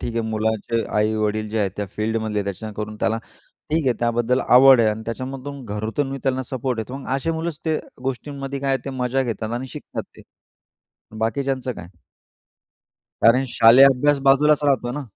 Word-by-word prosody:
ठीक 120 - -4
आहे, 115 - -1
मुलाचे 110 +1 -1
आई-वडील 110 0 0
जे 110 - -1
आहेत 100 -2 +1
त्या 105 - -3
फील्डमधले, 110 -1 -1
त्या 110 +3 -7
करून 105 0 -5
त्याला 115 0 +1 0.5
ठीक 160 -2 +1
आहे 125 - +4
त्याबद्दल 120 +2 +1
आवड 130 0 +7
आहे 110 - +4
आणि 110 +1 -5
त्याच्यामधून 130 +3 -6
घरातूनही 110 +7 -3
त्यांना 130 -1 0
सपोर्ट 130 -2 -2
येतो, 125 +5 -5
मग 140 - -10
अशी 135 +5 -1
मुलंच 160 -1 -3
त्या 160 -1 +1 0.2
गोष्टींमध्ये 135 +1 -4
काय 140 - -2
आहे 135 - 0
ते 140 - -4
मजा 130 0 -1
घेतात 110 -2 -4
आणि 120 +2 -3
शिकतात - - -6
ते. - - -13 1.0
बाकीच्यांचं 130 +3 -1
काय? 85 -6 -10 1.3
कारण 125 +4 +5
शालेय 120 +3 +7
अभ्यास 140 +2 +3
बाजूलाच 150 +2 +5
राहतो 130 -4 +1
ना. 145 +3 -4
125 Hz, 170 wpm, -22 LUFS, 110-135 Hz, 1.3 s, आवड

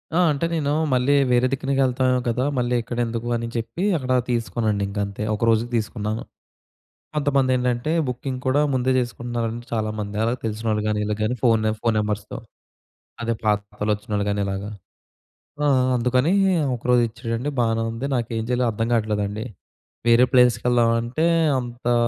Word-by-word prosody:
ఆ! - - +3
అంటే 145 +3 -1
నేనూ 150 -3 0 0.2
మళ్ళీ 130 +3 +3 0.2
వేరే 125 +1 +4
దిక్కునకి 135 0 0
ఎళ్తాఏమో 130 0 +1
కదా! 120 +2 0
మళ్ళీ 125 0 +1
ఇక్కడెందుకు 120 0 -3
అని 115 - -4
చెప్పి 115 +9 -3
అక్కడా 130 -3 0
తీసుకోనండి 115 -3 0
ఇంక 100 +1 -4
అంతే. 100 +1 -6
ఒకరోజుకు 115 +2 +1
తీసుకున్నాను. 110 0 -3 0.9
కొంతమందేంటంటే 130 -2 +1 0.2
బుకింగ్ 125 +1 -4
కూడా 130 +3 +3
ముందే 130 0 +1
చేసుకుంటున్నారండి 120 -1 -3
చాలామంది. 110 -2 -2
అలా 115 +1 +1
తెలిసినోళ్ళు 110 -1 -1
గానీ, 105 0 0
ఈళ్ళకు 105 0 -3
గానీ 120 +4 0
ఫోనె 110 -3 +3
ఫోన్ 115 -2 +1
నంబర్స్‌తో. 105 0 -3 0.8
అదే 115 0 0
పాతలోచ్చినోళ్ళు 105 0 -1
గానీ 100 0 0
ఇలాగా. 100 +2 -4 0.9
ఆ! - - +3 0.3
అందుకనీ 125 +6 +2 0.4
ఒకరోజు 120 +1 +2
ఇచ్చాడండి, 115 +4 -4
బానే 115 -1 +1
ఉంది. 115 +4 -4
నాకేం 115 -1 -2
జెయ్యాలో 125 0 +1
అర్థం 115 +2 -2
గాట్లేదండి. 105 -1 -1 0.6
వేరే 120 +1 +6
ప్లేసెస్‌కి 125 -2 +4
ఎళ్దామంటే 120 +6 +2 0.3
అంతా 120 0 -2
115 Hz, 135 wpm, -23 LUFS, 110-125 Hz, 0.9 s, వేరే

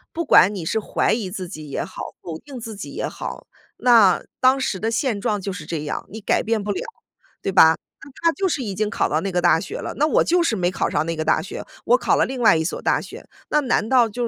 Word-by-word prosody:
不 335 - -1
管 205 - +6
你 185 - -5
是 220 +7 0
怀 215 - 0
疑 215 -4 -1
自 185 -2 -6
己 155 -6 -9
也 - - -2
好， - - -8
否 160 -2 -6
定 275 -3 -11
自 225 -2 -7
己 200 - -8
也 - - -3
好， - - -7 0.3
那 225 -7 +5 0.2
当 260 +1 +4
时 215 -7 -2
的 220 - -1
现 230 -3 -1
状 205 0 -1
就 195 - -4
是 180 -4 -7
这 155 -1 -4
样， 150 - -4
你 220 +2 -8
改 - - +1
变 220 -1 -1
不 205 - -2
了， 195 - -2 0.6
对 195 - -2
吧？ 160 -4 +7 0.3
那 - - -12
他 335 - +5
就 385 +3 -1
是 290 -6 -1
已 205 -4 -4
经 210 +2 -1
考 - - 0
到 155 - +1
那 195 - -3
个 180 -1 0
大 170 -2 +4
学 - - -6
了， - - -5
那 300 +2 +3
我 - - +3
就 350 +1 +2
是 330 -10 +1
没 180 -2 0
考 - - -1
上 150 - 0
那 165 0 -2
个 155 - -2
大 - - +2
学， 170 - -7 0.2
我 - - +4
考 - - +1
了 - - +3
另 260 -1 -5
外 225 - +6
一 160 - +1
所 160 - -3
大 - - +1
学。 - - -11 0.2
那 300 - +3
难 235 -4 0
道 250 -3 +5
就 240 +3 -4
210 Hz, 295 characters per minute, -22 LUFS, 180-245 Hz, 0.6 s, 吧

